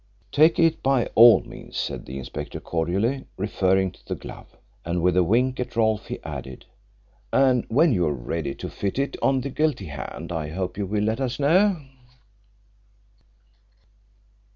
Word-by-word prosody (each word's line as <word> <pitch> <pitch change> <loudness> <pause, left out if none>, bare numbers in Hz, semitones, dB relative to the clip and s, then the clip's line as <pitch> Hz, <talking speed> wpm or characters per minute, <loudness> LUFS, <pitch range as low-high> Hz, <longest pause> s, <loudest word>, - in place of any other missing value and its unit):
"Take 155 +3 +5
it 165 -1 +3
by 135 -3 +2
all 115 0 +8
means," - - -10
said - - -4
the 65 - -6
inspector 65 - -6
cordially, 95 +11 -1
referring 95 -1 +1
to - - -22
the - - -2
glove. - - -12 0.3
And 85 +1 -2
with 90 -1 +3
a 90 - +4
wink 125 +8 +1
at 125 - -4
Rolfe 110 -2 +1
he - - -4
added, 65 -1 -7 0.7
"And 130 -3 +3
when 145 +5 +4
you 90 -5 +1
are - - +1
ready 70 +2 -4
to - - -6
fit 100 +2 -3
it 140 +1 -1
on 135 -1 +2
the 140 +2 -5
guilty 150 -8 0
hand 75 +1 -7
I 80 -3 -3
hope 90 +3 -4
you 100 -1 -3
will 105 +1 -1
let 110 +4 -1
us 130 -2 -2
know." 175 +4 +3
110 Hz, 165 wpm, -24 LUFS, 90-135 Hz, 0.7 s, all